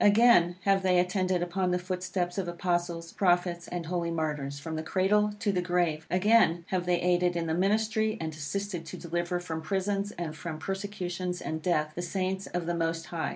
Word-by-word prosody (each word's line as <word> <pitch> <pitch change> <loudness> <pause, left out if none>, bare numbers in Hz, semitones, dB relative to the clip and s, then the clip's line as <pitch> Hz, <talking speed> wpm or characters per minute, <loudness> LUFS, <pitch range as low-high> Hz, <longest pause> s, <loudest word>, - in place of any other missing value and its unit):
Again 205 -5 +6
have 195 +1 +3
they 185 -1 +3
attended 180 0 +1
upon 180 +1 0
the 180 - +2
footsteps 180 0 -2
of 185 - -2
Apostles, 175 -1 -2
Prophets, 175 -2 +1
and 175 -1 -4
holy 170 0 -1
Martyrs, 150 -4 -2
from 160 +2 -5
the 155 - -2
cradle 210 +5 +2
to 205 - 0
the 180 -2 0
grave. 175 -3 0
Again 180 -3 +4
have 180 -2 -1
they 175 -1 +3
aided 180 0 +2
in 170 -1 -1
the 160 - -1
ministry, 215 +4 +1
and 160 -1 -3
assisted 175 +4 -3
to - - -6
deliver 175 +1 -2
from 165 -2 -4
prisons, 195 +4 -1
and 165 -3 -5
from 155 0 -5
persecutions 185 -1 -3
and 160 0 -4
death, 155 -3 +1
the 175 - -4
Saints 190 +2 -2
of 175 -1 -3
the 175 - -1
Most 165 -1 -1
High. 165 -1 -3
175 Hz, 195 wpm, -29 LUFS, 170-190 Hz, -, Again